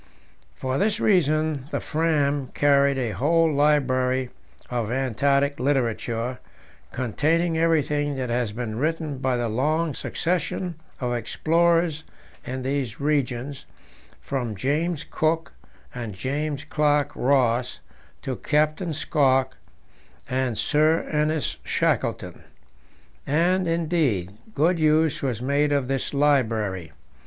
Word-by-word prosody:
For 130 0 -2
this 210 +2 +1
reason 155 -6 +2
the - - -2
Fram 145 -4 0
carried 140 -1 +3
a 120 -4 -1
whole 160 - +2
library 130 -3 +2 0.4
of 120 -3 -2
Antarctic 140 +3 +1
literature, 125 -2 -1 0.5
containing 160 +7 0
everything 150 -3 +1
that 130 -2 -3
has 120 -3 0
been 110 0 -4
written 155 -2 -2
by 130 -2 0
the 120 -1 -1
long 150 +8 0
succession 180 +3 -2 0.3
of 125 -1 -1
explorers 165 +6 +1 0.4
in 130 0 -5
these 130 -4 -2
regions, 140 -2 -1 0.5
from 120 -6 -3
James 150 - -1
Cook 160 +1 0 0.4
and 115 -5 -6
James 140 +6 -3
Clark 150 -1 +1
Ross 125 -2 +1 0.4
to 130 -2 -3
Captain 155 +2 0
Scott 135 -4 +2 0.7
and 130 -3 -1
Sir 155 +2 +2
Ernest 150 0 0
Shackleton. - - -1 0.8
And, 175 +5 +2
indeed, 160 - 0 0.2
good 165 +4 +2
use 155 0 +3
was 125 -4 -2
made 145 +2 +1
of 140 -3 +1
this 135 -1 -2
library. 110 - +1
140 Hz, 110 wpm, -24 LUFS, 125-155 Hz, 0.8 s, carried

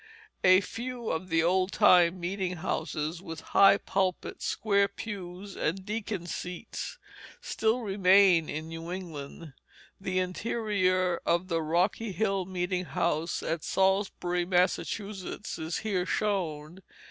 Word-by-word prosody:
A 185 +1 +7
few 240 +4 -5
of 185 +3 -3
the 165 -1 +3
old 185 +2 +2
time 180 -4 +5
meeting 180 +1 -2
houses, 160 -1 -3
with 165 -4 -7
high 195 0 +7
pulpit, 190 -2 -2
square 200 -2 +2
pews, 200 -2 -7
and 190 +4 -2
deacons' 205 -5 -4
seats, 180 - -6 0.4
still 225 +3 0
remain 190 -4 +4
in 155 +1 -4
New 165 +1 -6
England. 165 -4 -7 0.5
The 185 -1 -2
interior 185 -2 0
of 175 +2 +1
the 165 -1 +1
Rocky 180 +7 0
Hill 195 -2 0
meeting 180 0 -2
house 165 0 -1
at 165 -1 -2
Salisbury, 190 -2 +1
Massachusetts, 185 +2 -1
is 160 +1 -2
here 190 -4 -1
shown. 175 -5 -2
185 Hz, 125 wpm, -29 LUFS, 170-200 Hz, 0.5 s, A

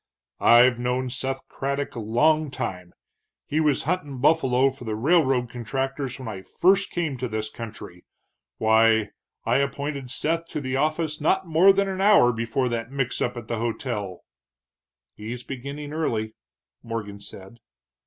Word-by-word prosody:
"I've 120 +1 +6
known 125 +1 -1
Seth 135 +1 -3
Craddock 140 +1 -3
a - - -4
long 150 +8 +2
time; 95 -10 -5 0.5
he 155 - -1
was 150 -3 +2
huntin' 150 -4 -2
buffalo 135 -2 +3
for 130 -1 -12
the 110 -2 -3
railroad 135 -1 +2
contractors 135 +2 -3
when 130 -3 -8
I 100 -4 -5
first 190 - +2
came 160 -6 -2
to 125 +1 -3
this 110 -1 -4
country. 105 -6 -9 0.5
Why, 110 -1 +3 0.3
I 120 +2 +3
appointed 140 -1 -2
Seth 165 +6 0
to 150 - -4
the 130 -2 -3
office 155 +1 -1
not 190 +5 +2
more 170 +4 +6
than 195 0 +1
an 190 0 -3
hour 195 -12 +6
before 115 +3 -1
that 115 +1 -3
mix 135 -2 -2
up 125 0 -1
at 115 -2 -7
the 115 -2 -2
hotel." 110 -5 -3 0.9
"He's 115 +3 -7
beginning 140 +3 -7
early," 110 -9 -2 0.5
Morgan 105 -3 -5
said. 100 +2 -12
130 Hz, 155 wpm, -25 LUFS, 115-150 Hz, 0.9 s, I've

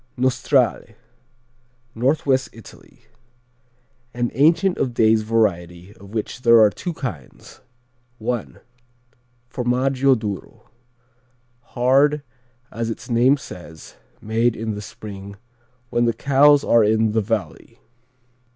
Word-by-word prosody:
Nostrale 130 -2 0 1.0
Northwest 130 +1 0
Italy 115 - -16 1.1
An 120 -1 -1
ancient 165 - +2
of 125 -3 -2
days 110 -1 +3
variety 95 -5 -1
of 100 0 -15
which 110 +3 -5
there 115 -2 +6
are 105 -2 +5
two 175 - -5
kinds: 110 - -9 0.6
I. 120 0 -2 1.1
Formaggio 130 +2 +1
Duro: 105 -4 -7 1.1
hard, 140 +4 +3 0.5
as 115 0 -4
its 115 - -7
name 125 +4 +4
says, 85 - -12 0.2
made 115 +2 0
in 110 0 -4
the 105 - -6
spring 100 -1 -10 0.6
when 120 0 +1
the 115 - +1
cows 140 +4 +4
are 115 -1 +4
in 110 +1 +2
the 110 +1 +1
valley. 105 -6 -4
115 Hz, 105 wpm, -21 LUFS, 110-130 Hz, 1.1 s, there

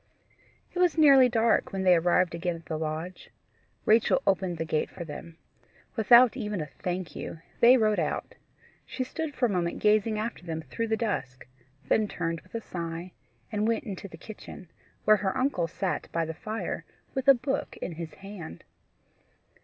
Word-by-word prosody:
It 360 - -3
was 355 -2 +3
nearly 275 -5 +7
dark 230 -1 +2
when 195 -1 -2
they 185 -1 +6
arrived 175 +1 +3
again 170 +1 -2
at 165 - -12
the 160 - -3
lodge. 160 +3 -4 0.6
Rachel 225 +4 +4
opened 190 -3 +1
the 165 - -2
gate 155 -1 0
for 170 - -8
them. 165 +2 -9 0.6
Without 235 +2 +7
even 210 -6 -3
a 155 - -2
THANK 175 +4 -5
YOU, - - -6 0.2
they 245 +2 +8
rode 215 -3 +2
out. - - -2 0.5
She 260 - -3
stood 305 +3 -5
for 250 - +2
a - - +2
moment 175 -3 -1
gazing 215 +1 +3
after 215 -3 -4
them 160 -2 -4
through 230 - -3
the 220 0 +1
dusk, 185 - -3 0.4
then 215 -1 +3
turned 165 -3 -3
with 185 - -15
a 230 - -2
sigh, 170 -1 -5 0.4
and 210 0 0
went 230 +5 +1
into 200 -5 -6
the 165 - -12
kitchen, 185 -2 -11 0.3
where 215 0 +6
her 195 +2 -1
uncle 255 -10 +1
sat 185 +2 -3
by 165 0 0
the 160 - -4
fire 215 +7 -4 0.3
with 265 0 -3
a 275 - +9
book 265 +3 -3
in - - -5
his 165 0 -7
hand. 190 - -9
195 Hz, 180 wpm, -28 LUFS, 170-230 Hz, 0.6 s, a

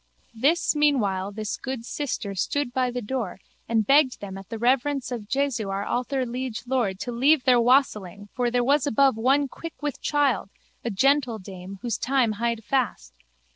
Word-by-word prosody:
This 290 +9 +2
meanwhile 205 -11 +1
this 215 0 -4
good 260 -3 -5
sister 245 -8 -3
stood 245 +7 -1
by 255 0 +1
the 245 -1 -4
door 215 -5 -3 0.3
and 225 -2 +2
begged 275 0 +4
them 195 -2 -7
at 195 -1 -10
the 225 - -4
reverence 260 +3 +1
of 220 -4 -5
Jesu 270 -7 0
our 195 +1 -2
alther 255 +1 -1
liege 245 -1 -4
Lord 240 -7 0
to 245 - -3
leave 265 +4 +3
their 250 -2 +5
wassailing 210 -6 +1
for 245 -1 0
there 245 0 +1
was 280 +2 +2
above 275 0 +4
one 270 +5 +2
quick 330 +5 -9
with 295 -3 -4
child, 280 -9 +1 0.3
a 235 - -1
gentle 255 +2 +2
dame, 190 -1 -9
whose 235 -4 -2
time 255 -3 +2
hied 235 -1 -1
fast. 210 - -1
245 Hz, 175 wpm, -25 LUFS, 215-275 Hz, 0.3 s, their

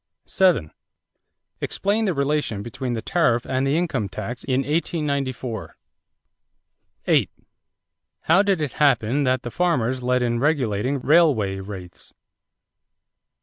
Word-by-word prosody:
7. 175 - +2 0.9
Explain 210 +3 -1
the 185 -5 0
relation 140 -7 -1
between 120 +2 -4
the 110 -2 -4
tariff 140 -8 +1
and 130 +1 0
the 140 +3 +2
income 160 - -1
tax 120 +6 -6
in 130 0 0
1894. 140 - -2 1.3
8. - - +3 0.9
How 170 +5 +4
did 195 -5 +1
it 145 -4 -2
happen 140 -1 +2
that 130 -1 +1
the 120 - -5
farmers 130 -8 0
led 125 0 +1
in 120 -1 0
regulating 130 -2 0
railway 130 - +3
rates? 95 -2 -9
130 Hz, 115 wpm, -23 LUFS, 115-155 Hz, 1.3 s, How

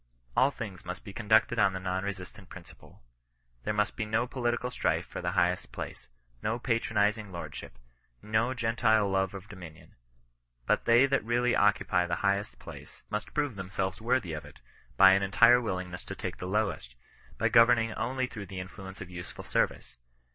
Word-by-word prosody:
All 130 - +5
things 105 -9 -7
must 90 +1 -7
be 100 - -9
conducted 110 +1 +3
on 100 -2 +4
the 95 - -3
non 95 0 -2
resistant 100 0 -7
principle. 90 -7 -14 0.6
There - - 0
must 105 0 0
be 110 - -2
no 110 +2 0
political 125 -1 -2
strife - - 0
for - - -7
the - - -2
highest 90 +1 +1
place; - - -7 0.3
no 110 +2 -1
patronizing 110 -3 0
lordship; 85 -7 -8 0.4
no 110 - 0
Gen 115 -2 -1
tile 110 -3 +4
love 95 0 0
of 100 +1 -9
dominion; 90 -7 -12 0.7
but - - +1
they 120 +3 +6
that 140 0 +1
really 120 +2 +1
occupy 100 -3 +2
the 85 - 0
highest 100 +1 0
place, - - -12
must 105 0 -4
prove 145 -5 0
themselves 95 +1 -3
worthy 115 -7 0
of 75 0 -5
it, 75 0 -14 0.4
by 95 -1 +9
an 95 +1 +4
entire 105 +5 +5
willingness 90 -5 -4
to - - -6
take - - -5
the 90 - -6
lowest; 95 - -1 0.4
by - - +2
governing 115 -1 +5
only 130 +2 -1
through 105 -5 -8
the 95 +1 -6
influence 95 +1 -9
of 90 -1 -8
useful 85 -1 -8
service. - - -1
105 Hz, 175 wpm, -29 LUFS, 95-115 Hz, 0.7 s, by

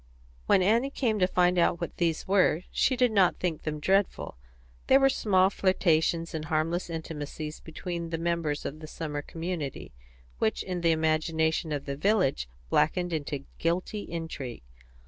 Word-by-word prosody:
When 185 - +5
Annie 230 +7 +3
came 230 -6 0
to 180 - +4
find 180 -1 +3
out 170 0 +2
what 170 - -5
these 165 -2 0
were, 185 -3 +3
she 260 - +2
did 250 -1 +3
not 195 -4 +3
think 170 -4 -2
them 150 -1 -3
dreadful; 195 - +1 0.5
they 270 - +7
were 270 0 +5
small 190 -6 +3
flirtations 170 -3 +1
and 155 -1 -4
harmless 165 +3 -1
intimacies 155 -1 -5
between 170 +1 -5
the 165 - -2
members 165 -3 -1
of 150 +2 -5
the 155 - -9
summer 150 -2 -4
community, 165 - -5 0.5
which 110 - 0
in 180 -2 -4
the 170 - +3
imagination 160 0 +1
of 145 -2 -3
the 140 - -3
village 165 - +1 0.2
blackened 175 +2 +2
into 145 -3 -3
guilty 180 +5 -1
intrigue. 160 - -6
165 Hz, 160 wpm, -28 LUFS, 155-185 Hz, 0.5 s, they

